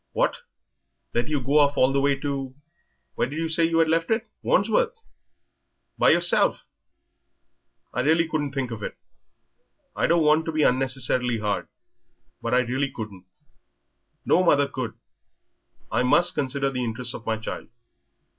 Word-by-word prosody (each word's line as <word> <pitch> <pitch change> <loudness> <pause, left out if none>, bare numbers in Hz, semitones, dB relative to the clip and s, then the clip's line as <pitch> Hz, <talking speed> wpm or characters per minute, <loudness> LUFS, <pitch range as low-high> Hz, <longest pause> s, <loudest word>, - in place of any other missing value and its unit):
"What! - - +1 0.8
let 120 - 0
you 150 -2 0
go 140 +4 +2
off 145 -1 +3
all 130 +1 +3
the 140 - +2
way 140 0 +2
to 135 -2 -4 0.6
where - - -1
did 145 - -6
you 165 0 -1
say 165 +1 +2
you 165 0 0
had 165 -1 +4
left 165 +1 0
it 225 0 0
Wandsworth? - - +1 1.0
by - - +4
yourself! - - +3 1.3
I - - -2
really 160 +5 +2
couldn't 150 -3 -2
think 135 -3 -3
of 110 -2 -6
it. - - -6 1.0
I - - +1
don't 170 -1 +3
want 155 +1 +3
to 160 - -2
be 155 -1 +1
unnecessarily 125 -2 +1
hard 105 -4 -2 0.7
but 115 - -3
I 125 - +4
really 130 +3 -1
couldn't 105 -7 -9 1.0
no 185 - +3
mother 145 -5 +3
could. 130 -5 -5 1.0
I 115 +4 +1
must 170 +8 +3
consider 135 0 -1
the 125 -1 -3
interests 120 +1 -2
of 115 - -9
my 110 0 0
child. 110 - -7
140 Hz, 155 wpm, -24 LUFS, 125-160 Hz, 1.3 s, had